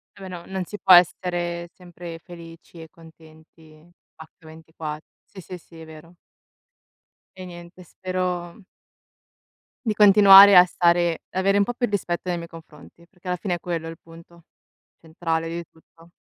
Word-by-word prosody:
Eh 195 - -17
beh, 190 - -9
no, 175 -2 -9
non 190 -1 -5
si 210 - -9
può 185 - +5
essere 175 -1 +1
sempre 175 -2 -11
felici 170 -1 -14
e 160 - -13
contenti 160 -2 -20 0.4
H 160 - -13 0.2
ventiqua 160 -1 -9 0.3
sì, 190 - -14
sì, 180 +1 -10
sì, 165 -1 -18
è - - -11
vero. 160 +2 -16 1.2
E 185 0 -10
niente, 175 +1 -13
spero 180 +1 -5 1.2
di 220 - 0
continuare 200 -1 +8
a 180 - +8
stare 175 -1 0
avere 195 +2 0
un 205 - +3
po' 245 +4 -4
più 245 0 -2
rispetto 180 -4 -3
nei 175 -1 -2
miei 170 0 -9
confronti, 165 +1 -16
perché 180 0 -18
alla 180 0 -2
fine 180 +1 -4
è 175 - -9
quello 170 -2 -5
il 165 - -9
punto, 170 +1 -18 0.6
centrale, 165 0 -4
di 170 +1 -6
tutto. 165 +1 -24
175 Hz, 160 wpm, -22 LUFS, 165-185 Hz, 1.2 s, continuare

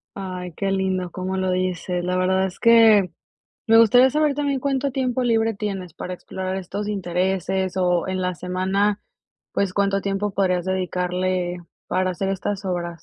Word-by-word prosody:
Ay, 185 -2 -6
qué 195 -1 -1
lindo 190 -2 -1
cómo 185 +2 -3
lo 185 0 0
dices. 180 -1 -2
La 180 +1 0
verdad, 190 +1 +2
es 185 - -8
que 225 -5 +6 0.6
me 225 0 +6
gustaría 245 +4 +6
saber 300 +1 +2
también, 280 -2 -1
¿cuánto 275 0 0
tiempo 255 -1 -1
libre 225 -1 +2
tienes 195 -5 -5
para 180 - -6
explorar 185 +1 -5
estos 195 +2 -4
intereses? 190 -1 -1
O 180 -1 +1
en 185 0 -2
la 180 0 -1
semana, 190 +4 0 0.5
pues, 200 -2 0
¿cuánto 200 0 +1
tiempo 200 +1 -1
podrías 185 -3 +1
dedicarle, 180 -1 -1 0.3
para 185 0 +1
hacer 190 +2 -3
estas 195 +1 -3
obras? 175 -2 -3
190 Hz, 160 wpm, -22 LUFS, 180-205 Hz, 0.6 s, que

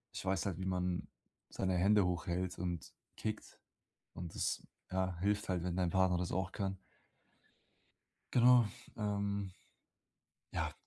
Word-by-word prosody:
ich - - -4
weiß 95 0 +1
halt, 95 -4 -1
wie 95 - -2
man 90 -1 0 0.4
seine 95 -1 0
Hände 100 +2 +5
hochhält 90 +1 -1
und 90 -2 -3 0.2
kickt. 110 -1 -4 0.5
Und 85 -2 -6
das, - - 0 0.3
ja, 95 -1 0
hilft 105 +1 +1
halt, 90 -2 +1
wenn 90 -1 -1
dein 90 -1 +2
Partner 95 0 +3
das 90 - -1
auch 95 0 0
kann. 95 -1 -2 1.6
Genau. 125 -2 +7 0.3
Ähm. 100 -2 -1 1.0
Ja. - - -1
95 Hz, 130 wpm, -36 LUFS, 90-100 Hz, 1.6 s, Genau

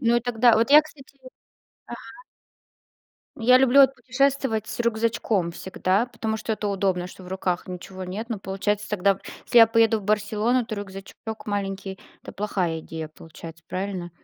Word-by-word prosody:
ну 235 0 +3
и - - +2
тогда 240 0 +3
вот 230 +4 +1
я, 300 +1 +9
кстати, 280 -2 -17 0.7
ага. 235 - -7 1.4
Я 250 +2 +6
люблю 265 +1 +5
вот 270 0 +4
путешествовать 270 -4 0
с - - -6
рюкзачком 225 -5 0
всегда, 190 +5 -1
потому 220 -3 -4
что 220 - -3
это 210 -1 -3
удобно, 190 -3 0
что 185 - -13
в 180 - -11
руках 185 -1 -2
ничего 185 +1 -8
нет. 210 +6 -6
Но 225 - -2
получается 200 +2 -2
тогда, 200 -1 +1 0.3
если 240 - +4
я 225 - +9
поеду 225 -1 +3
в - - -13
Барселону, 215 +4 +1
то 220 - -5
рюкзачок 195 -1 -8 0.3
маленький- 195 -2 -4 0.2
это - - -10
плохая 185 -5 -2
идея 160 0 -7
получается, 165 +1 -12
правильно? 185 -2 -4
210 Hz, 165 wpm, -24 LUFS, 190-235 Hz, 1.4 s, я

